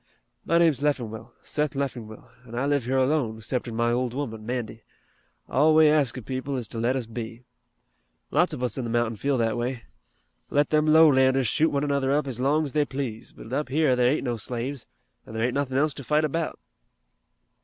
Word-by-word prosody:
My 170 - +3
name's 160 -6 +3
Leffingwell, 120 -7 -2
Seth 150 -1 -2
Leffingwell, 120 -6 -5 0.2
an' 115 - -9
I 125 +3 0
live 140 -3 +1
here 130 +2 0
alone, 130 -5 +1
'ceptin' 120 +1 -3
my 120 +1 +1
old 125 0 -1
woman, 115 -6 -4
Mandy. 120 -2 -4 0.7
All 155 +4 +3
we 155 0 +7
ask 145 -5 +3
of 125 - -8
people 130 +2 -3
is 120 -3 -4
to 115 - -5
let 120 +3 +1
us 130 -3 -2
be. 115 +1 -7 0.9
Lots 180 - +3
of 140 -5 -4
us 125 0 0
in - - -2
the 120 - -4
mountain 120 -1 0
feel 140 +5 0
that 115 -1 0
way. 120 0 -3 0.7
Let 145 0 +1
them 155 0 +3
lowlanders 135 -5 +5
shoot 160 +8 +2
one 140 0 -1
another 140 -2 0
up 145 +1 +1
ez 130 -3 -4
long 145 +4 +2
ez 145 - -4
they 150 +1 +2
please, 130 -6 -5
but 115 - -11
up 145 -1 -1
here 145 -2 +2
there 125 0 +3
ain't 145 - 0
no 120 -3 -2
slaves, 120 +4 -5 0.4
an' 110 - -9
there 110 - -1
ain't 120 +1 +1
nothin' 135 -2 -1
else 150 +1 +2
to 140 - -9
fight 150 +4 +2
about." 160 +2 -2
130 Hz, 210 wpm, -25 LUFS, 120-145 Hz, 0.9 s, we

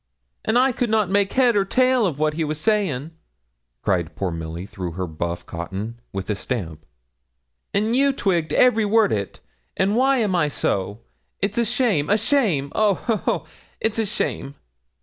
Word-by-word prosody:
'And 225 - +2
I 260 +2 +4
could 245 -1 -1
not 215 -4 +1
make 200 0 +2
head 250 -3 +4
or 200 - +4
tail 255 +2 +3
of 155 -6 -3
what 155 0 +1
he 160 +1 -1
was 155 0 -3
saying,' 165 - 0 0.7
cried 90 -5 0
poor 95 -2 -2
Milly 80 +2 -5
through 90 -4 -6
her 95 +2 -3
buff 85 +1 -4
cotton, 100 +7 -6
with 95 0 -5
a - - 0
stamp; 85 - -5 0.8
'and 215 +3 +1
you 275 +1 +4
twigged 175 - 0
every 230 -3 +4
word 215 0 +3
o't. 100 -2 -3 0.4
An' 195 +2 +2
why 265 +3 +3
am 210 -6 +1
I 160 -4 +2
so? 105 -6 -2 0.4
It's 200 +3 -1
a 235 - +2
shame 220 - +1
a 210 - +4
shame! 205 - +1
Oh, 210 -2 +3
ho, 230 +3 -1
ho! - - -1 0.3
it's 220 0 -1
a 220 - +1
shame!' 140 -8 -3
190 Hz, 180 wpm, -22 LUFS, -, 0.8 s, I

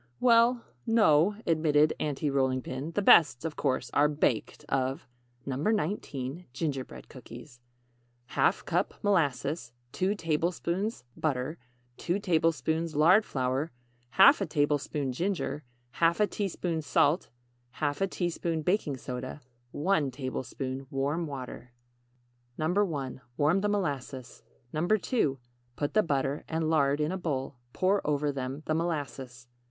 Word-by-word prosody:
"Well, 235 0 +4 0.2
no," 205 -4 +4
admitted 155 -2 +3
Aunty 145 0 -1
Rolling 130 -2 +1
Pin, 135 +4 -5
"the 205 - 0
best, 150 -7 +6
of 160 - -3
course, 130 -3 -1
are 145 +1 +5
baked 145 -6 -1
of 135 0 -1 0.4
NO. 135 -2 -3
19. 160 - -2
GINGERBREAD 135 -2 -4
COOKIES. 120 0 -12 0.7
½ - - +2
cup - - 0
molasses 145 -7 0 0.2
2 190 +2 0
tablespoons 170 - -1
butter 145 +1 -2 0.4
2 175 +2 -1
tablespoons 165 -3 0
lard 175 +8 +6
flour 130 0 -1 0.5
½ 195 - +6
tablespoon 145 -2 0
ginger 170 0 -2 0.3
½ 170 +5 +2
teaspoon 175 -5 -2
salt 150 +3 +2 0.5
½ 150 +6 -1
teaspoon 170 -3 -2
baking 165 -6 0
soda 125 +3 -6 0.3
1 155 0 +1
tablespoon 130 0 -5
warm 145 +5 -1
water 125 -3 -8 0.8
1. 155 -6 -1 0.2
Warm 155 +6 +3
the 205 - +1
molasses. 140 - -3 0.3
2. 175 - +1 0.4
Put 145 0 -2
the 215 - +5
butter 140 -4 -1
and 160 0 0
lard 145 -2 +3
in 150 +2 0
a 190 - -3
bowl. 140 -6 -3
Pour 195 +6 +2
over 145 0 0
them 135 +2 -5
the 155 - 0
molasses. 135 -7 -3
150 Hz, 120 wpm, -29 LUFS, 135-175 Hz, 0.8 s, best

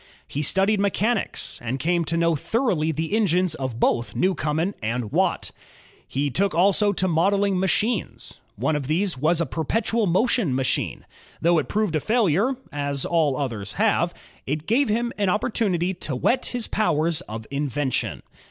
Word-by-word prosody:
He 145 - -3
studied 195 +7 +2
mechanics, 200 +3 0
and 120 +3 -2
came 170 +4 0
to 165 +2 0
know 170 -1 +2
thoroughly 175 - 0
the 160 +5 -3
engines 185 -5 +2
of 130 -6 -4
both 120 -1 +1
Newcomen 175 0 0
and 115 0 -2
Watt. - - 0 0.6
He 140 +1 -1
took 195 +7 0
also 200 +4 +4
to 185 -1 0
modeling 195 +3 +2
machines. 210 +5 -1 0.2
One 155 - 0
of 140 -3 -3
these 175 +5 +1
was 155 +6 +1
a 170 - +2
perpetual 215 - 0
motion 190 - +2
machine. 130 -1 -1 0.3
Though 170 0 +3
it 150 - -4
proved 210 -6 0
a - - +2
failure, 220 - +2 0.2
as 145 -1 -2
all 155 -6 +1
others 115 -7 -4
have, 200 -5 +2 0.4
it 150 +3 -2
gave 250 +5 +2
him 235 +3 0
opportimity 195 -2 +1
to 140 - -3
whet 250 - +1
his 245 -2 -3
powers 165 -6 +1
of 110 +1 -6
invention. 135 - -2
170 Hz, 155 wpm, -24 LUFS, 145-205 Hz, 0.6 s, also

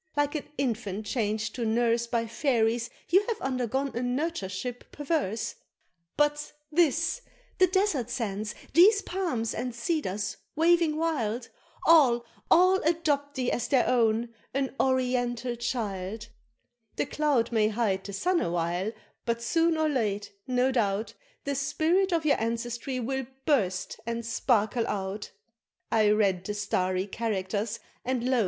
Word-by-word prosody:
Like 290 0 +2
an 300 - -4
infant 215 -6 -2
changed 215 -1 -1
to 245 - -3
nurse 230 +1 +2
By 230 -1 0
fairies, 230 -1 +1 0.2
you 380 +4 +5
have 455 -2 -2
undergone 265 +1 -1
a 240 - -4
nurtureship 245 - -3
perverse; 285 - -1 0.6
But 295 0 +1 0.2
this 330 - +2 0.4
these 370 -1 +6
desert 370 - +1
sands 215 -4 -3 0.2
these 405 +5 +6
palms, 325 -12 -2
and 250 -1 -4
cedars 215 - -2 0.2
waving 330 -1 +3
wild, 255 -8 -1 0.4
All, 255 -8 +6 0.2
all, 370 +2 +6
adopt 300 -4 0
thee 255 -2 0
as 240 - -1
their 260 -3 +3
own 230 -1 +2 0.2
an 270 -1 0
oriental 250 -2 +1
child 220 -3 -3 0.7
The - - 0
cloud 285 -5 +1
may 220 -2 +3
hide 210 -3 0
the 200 - -7
sun 355 - +1
awhile 175 +4 -1 0.3
but 235 0 +1
soon 330 +3 +2
or 315 0 +2
late, 210 -7 -1 0.2
no 255 +1 +2
doubt, 215 -3 0 0.3
The 280 - -1
spirit 315 +8 +1
of 330 -2 +1
your 285 -6 +3
ancestry 235 +3 -2
will 265 +1 -2 0.2
burst 200 - 0
and 235 0 -3
sparkle 230 0 +1
out! 200 +1 -3 0.6
I 215 -2 +4
read 200 -4 +2
the 205 +2 -4
starry 185 -2 0
characters 210 0 -2 0.2
and 250 -1 -1
lo! 255 -1 +3
240 Hz, 135 wpm, -28 LUFS, 215-290 Hz, 0.7 s, these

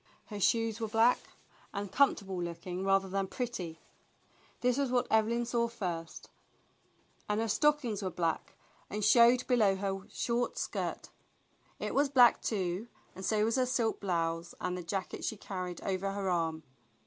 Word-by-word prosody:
Her 205 - -4
shoes 225 +2 +2
were 225 - 0
black 225 +3 +4 0.6
and 200 -1 -4
comfortable 195 -7 +2
looking 175 +2 -4
rather 195 0 +3
than 195 +1 -1
pretty, 185 -10 -4 0.8
this 250 0 +3
was 275 -2 +1
what 245 0 +2
Evelyn 225 +2 +2
saw 235 0 +1
first, 175 -8 -5 1.0
and 210 +1 +1
her 225 - 0
stockings 245 -3 +2
were 190 - -1
THE - - -15
BLUE 175 - 0
AUNT 160 - -1
COMES - - -30
11 - - -28
black - - -14
and 210 -1 0
showed 240 +3 +6
below 220 -6 +4
her 195 0 -4
short 240 0 -1
skirt. - - -3 0.7
It - - -4
was 280 0 +3
black, 250 -3 +6
too, 190 0 -2 0.3
and 190 - -9
so 215 +1 +2
was 230 +3 +1
her 255 -1 +2
silk 240 -3 0
blouse 165 -3 -2
and 180 - -2
the 180 - -4
jacket 180 +2 -4
she 220 - -2
carried 185 -3 -5
over 195 0 -2
her 200 -1 -3
arm. 165 -2 -1
205 Hz, 175 wpm, -32 LUFS, 185-235 Hz, 1.0 s, showed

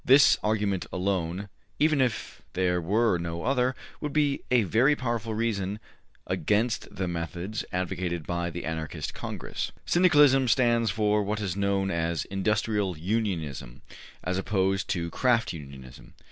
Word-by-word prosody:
This 135 +2 +7
argument 105 -3 0
alone, 95 0 -1 0.3
even 150 -2 +3
if 110 -10 -2
there 90 -1 +1
were 100 +2 +2
no 85 0 -4
other, 130 0 +1 0.2
would 150 -2 -4
be 145 -2 +2
a 125 -3 +4
very 120 +9 +3
powerful 115 -4 -2
reason 105 -3 -1 0.5
against 110 +3 0
the 95 -1 -2
methods 85 +4 -4
advocated 90 -2 -2
by 85 0 -2
the 85 +1 -6
Anarchist 80 -1 -4
Congress. - - -5
Syndicalism 145 -7 +5
stands 120 -1 +3
for 105 +1 +2
what 105 +1 -2
is 95 -4 -2
known 100 -1 0
as 85 -1 -1
industrial 100 -1 0
unionism 80 - -3 0.4
as 90 +1 -1
opposed 95 -1 0
to 85 -2 -2
craft 120 -5 +2
unionism. 70 -5 -11
100 Hz, 135 wpm, -27 LUFS, 85-115 Hz, 0.5 s, This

